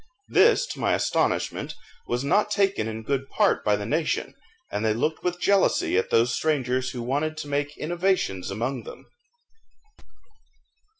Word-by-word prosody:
This, - - +5
to - - -12
my - - +1
astonishment, - - -1 0.3
was 120 +2 -1
not 205 +9 +2
taken 195 - +1
in 110 0 -5
good 135 +2 -2
part 210 -2 +2
by 105 - +3
the 100 0 -4
nation, 155 +5 -1 0.4
and 105 - -2
they 110 -1 +2
looked 155 +7 -1
with 180 0 -1
jealousy 200 - +2
at 95 - +1
those 120 +1 +3
strangers 130 -4 0
who 120 -2 -5
wanted 145 +5 -1
to 155 - -5
make 145 +1 -2
innovations 170 - -1
among 120 +6 -2
them. - - -11
140 Hz, 155 wpm, -25 LUFS, 115-165 Hz, 0.4 s, This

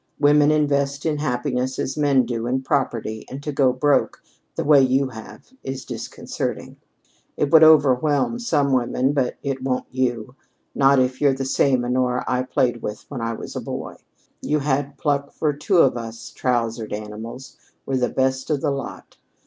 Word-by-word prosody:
Women 145 0 +5
invest 140 -1 +1
in 155 -2 0
happiness 130 -2 -2
as 135 - -2
men 140 -4 +3
do 115 -1 -3
in 130 +2 -1
property, 115 -6 -1
and 135 +2 -8
to 150 - -3
'go 135 -2 +3
broke' 140 +3 +1 0.3
the - - -2
way 145 -2 +6
you 130 +1 +2
have 115 - -12
is 135 0 -5
disconcerting. - - -5 0.6
It 145 - 0
would 160 -1 +8
overwhelm 150 - +4
some 145 - +1
women; 130 +2 +1
but 135 -4 -1
it 135 -2 -3
won't 130 -1 -1
you 125 -2 -2 0.4
not 135 0 +4
if 130 0 0
you're 140 -2 +4
the 135 0 -3
same 130 -1 +2
Honora 125 0 0
I 125 -1 +1
played 125 -2 0
with 105 0 -6
when 135 -5 -5
I 115 0 -2
was - - -8
a - - -3
boy. - - -6 0.4
You 150 - 0
had 140 -1 -1
pluck 140 0 -1
for 150 -2 0
two 150 +7 0
of 135 -7 +5
us 115 0 -7
trousered 115 -3 -2
animals 110 +5 -8 0.3
were 135 - -1
the 125 -1 +1
best 130 0 -1
of 150 -3 0
the 145 - 0
lot. 140 0 -7
130 Hz, 175 wpm, -22 LUFS, 125-145 Hz, 0.6 s, would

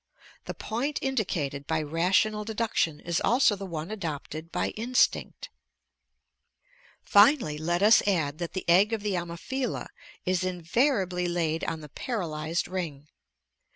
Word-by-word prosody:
The - - -5
point 270 +7 -2
indicated 170 - -2
by 160 -1 0
rational 185 +7 +1
deduction 210 -8 -1
is 170 -1 -1
also 240 -3 +4
the 195 0 -7
one 165 +1 -5
adopted 160 -4 -5
by - - -1
instinct. 245 +3 0 1.5
Finally, 205 - +4
let 175 +4 0
us 215 +2 +7
add 160 -6 0
that 170 -1 -4
the 185 - -5
egg 195 +6 +5
of 220 -2 -2
the 205 -2 -1
Ammophila 175 +10 -3 0.4
is 185 0 +1
invariably 185 - 0
laid 165 -2 -1
on 165 -1 -3
the 150 - -9
paralyzed 165 - -3
ring. 155 -6 -5
180 Hz, 130 wpm, -27 LUFS, 160-215 Hz, 1.5 s, us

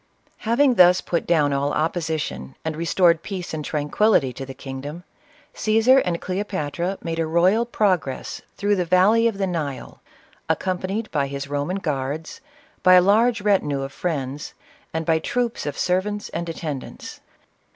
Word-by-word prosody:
Having 260 +3 +4
thus 180 -4 +6
put 170 - -2
down 150 -4 +3
all 140 +1 0
opposition, 155 - -2
and 160 -1 -2
restored 170 0 +3
peace 185 -3 -6
and 155 -1 -3
tranquillity 150 - +1
to 135 +2 -7
the 135 - -8
kingdom, 145 +5 -7 0.5
Csesar 225 +5 +4
and 170 -2 -1
Cleo 185 +2 -2
patra 180 0 -3
made 165 -1 -3
a 165 - 0
royal 185 +8 +3
progress 185 - -1 0.2
through 205 0 +1
the 180 - +1
valley 190 +7 +4
of 220 -4 -2
the 195 - 0
Nile, 155 -7 -4 0.5
accompanied 190 +4 -2
by 140 -3 0
his 140 0 -5
Koman 145 +7 -3
guards, 145 - -3 0.4
by 185 0 +7
a - - +9
large 220 +4 +3
retinue 165 -9 +1
of 135 0 -6
friends, 145 -4 -4 0.4
and 160 0 -3
by 160 0 +2
troops 240 +2 -2
of 145 - -4
servants 205 +3 -1
and 170 0 -4
attend 150 -5 -4
ants. - - -10
170 Hz, 160 wpm, -23 LUFS, 145-195 Hz, 0.5 s, a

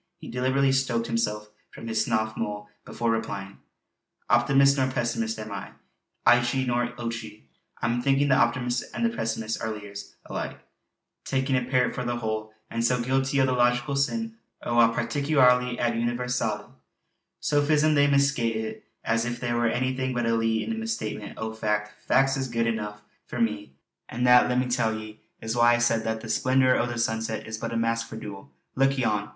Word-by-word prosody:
He - - -11
deliberately 130 +2 +1
stoked 130 -3 +1
himself 105 -2 -2 0.2
from - - -11
his 110 -1 +1
snuff 110 0 -1
mull 105 0 -4 0.2
before 115 0 -1
replying: 100 -4 -4 0.7
"Optimist 140 0 +5
nor 130 -2 +1
pessimist 115 -3 -1
am 110 0 -7
I, 100 - -6 0.5
eechie 120 +2 +4
nor 120 -1 +1
ochie. 115 -2 -5 0.4
I'm 120 +2 +1
thinkin' 140 +2 +2
the - - +5
optimist 120 +1 +1
and 235 - 0
the 230 0 0
pessimist 110 0 -2
are 110 - -2
lears 105 -2 -8
alike; - - -5 0.6
takin' 135 0 0
a 125 -2 +1
pairt 125 -1 +2
for 125 - -3
the 120 0 -1
whole, 110 -2 -3 0.2
an' 115 - -1
so 125 +1 +2
guilty 135 +3 +1
o' 130 - +5
the 130 - 0
logical 125 +3 +2
sin 225 +11 -1 0.3
o' 120 0 +1
a 115 -1 +6
particulari 125 0 +2
ad 120 -1 +1
universale. 120 -2 -2 0.7
Sophism 150 +1 +2
they 145 -1 +4
misca' 140 -5 +2
it; 110 0 -5 0.2
as 115 0 +1
if 120 0 -3
there 120 -1 -1
were 120 0 +2
anything 130 +1 -1
but 120 -1 0
a 115 - +2
lee 115 -1 +1
in 110 - -4
a - - -1
misstatement 110 -2 -4
o' 110 0 -4
fac'. 105 -1 -1 0.2
Fac's 135 +1 +4
is 135 -1 -2
good 115 -1 0
eneuch 105 -2 -2 0.3
for 120 - -5
me; 105 - -1 0.3
an' 120 - -3
that, 125 0 +6
let 125 - +1
me 125 - +2
tell 115 -3 0
ye, 110 0 -9 0.2
is 110 +1 -3
why 120 0 +5
I - - +1
said 115 -1 +2
that 110 0 -2
the 115 - -8
splendour 130 +1 +3
o' 120 - +1
the 120 -1 -4
sunset 110 -1 -1
is 110 0 -6
but - - -4
a 115 - -1
mask 115 0 0
for - - -8
dool. 100 -7 -8 0.3
Look 135 +1 +2
yon! 105 -5 0
120 Hz, 190 wpm, -26 LUFS, 110-130 Hz, 0.7 s, a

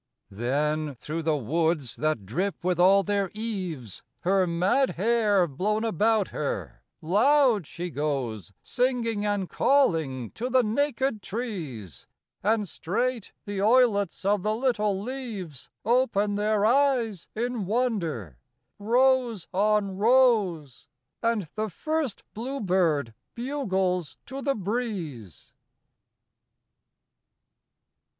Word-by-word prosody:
Then 145 +7 -1
through 155 +6 -4
the 155 -1 +1
woods, 155 +1 0
that 155 -9 -1
drip 175 - -2
with 180 -1 0
all 195 +2 +6
their 200 -2 0
eaves, 185 - -5 0.2
Her 190 0 +2
mad 190 +11 +1
hair 210 -1 +3
blown 205 +9 -1
about 220 0 +2
her, - - -4 0.2
loud 225 - +3
she 175 0 -6
goes 130 - -3
Singing 240 -4 0
and 205 -3 -1
calling 160 - +1
to 245 +3 -4
the 255 0 +4
naked 260 0 0
trees, 160 - -6 0.3
And 210 0 +1
straight 235 +7 -2
the 200 -1 -3
oilets 210 -5 +3
of 205 0 +2
the 215 +2 0
little 215 -5 0
leaves 210 - -6 0.2
Open 225 -4 +2
their 210 0 +1
eyes 240 -6 +2
in 235 -3 -2
wonder, 170 - -1 0.4
rows 240 -2 +2
on 200 0 +1
rows, 210 - +2 0.3
And 230 -6 0
the 215 0 -2
first 310 - -2
bluebird 185 - 0 0.2
bugles 190 - -1
to 270 +1 -6
the 275 0 0
breeze. 190 - -5
205 Hz, 105 wpm, -26 LUFS, 165-235 Hz, 0.4 s, all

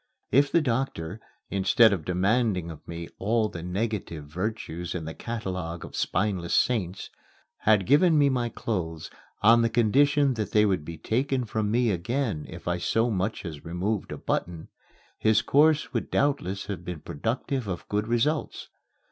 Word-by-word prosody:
If 140 +4 +4
the 170 - +4
doctor, 115 - -2 0.3
instead 100 +3 +5
of 85 -6 -3
demanding 95 -1 +1
of 80 - -12
me 85 0 -6
all 110 +2 +1
the 85 - -7
negative 90 -4 -3
virtues 90 0 -4
in 85 -3 -4
the 80 - -5
catalogue 90 -8 -5
of - - -10
spineless 95 -5 0
saints, 95 -7 0 0.5
had 105 -3 +3
given 155 - +5
me 145 -1 +5
my 125 -3 0
clothes 85 -10 -4 0.3
on 115 +2 +7
the 115 - +2
condition 135 +5 +3
that 110 -3 -4
they 105 0 +5
would 95 -6 +1
be 80 +1 -7
taken 130 - 0
from 110 -1 -1
me 120 +1 +2
again 100 - -2
if 85 +2 -10
I 85 0 0
so 115 +6 +1
much 100 +1 -2
as 75 -4 -7
removed 90 +5 -2
a - - -4
button, 85 -2 -3 0.5
his 110 0 +3
course 150 +4 +3
would - - -2
doubtless 135 -10 0
have 95 -4 -5
been 90 -4 -6
productive 120 - -3
of 90 -3 -5
good 105 +1 -1
results. 140 +7 -1
105 Hz, 165 wpm, -27 LUFS, 90-120 Hz, 0.5 s, on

